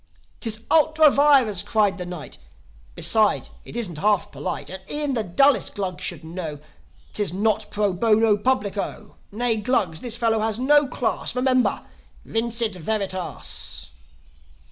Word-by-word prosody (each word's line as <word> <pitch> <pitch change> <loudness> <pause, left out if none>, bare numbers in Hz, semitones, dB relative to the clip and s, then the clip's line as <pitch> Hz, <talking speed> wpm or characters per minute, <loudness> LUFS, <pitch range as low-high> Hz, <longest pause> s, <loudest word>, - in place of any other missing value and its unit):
"'Tis 220 -2 -4
ultra 315 -1 +5
vires!" 270 -10 +4
cried 205 -3 +1
the 180 - -5
Knight. 175 -4 -8 0.6
"Besides, 215 -2 +1
it - - -8
isn't 180 -10 -2
half 205 0 +1
polite. 180 - -5
And 190 0 -6
e'en 295 -2 -1
the 235 - 0
dullest 275 +10 +3
Glug 185 -3 -4
should 170 -3 -3
know, 160 -2 -6 0.6
'Tis 205 -5 -1
not 215 +2 0
pro 205 -2 0
bono 220 +2 +3
publico. 210 -2 -2
Nay, 230 +1 0
Glugs, 205 -8 0
this 240 -2 -2
fellow 225 -2 +1
is 220 - -4
no 290 +3 +4
class. 250 -1 -2
Remember! 255 0 +1 0.4
Vincit 230 -1 0
veritas!" 190 0 -3
215 Hz, 135 wpm, -23 LUFS, 190-245 Hz, 0.6 s, ultra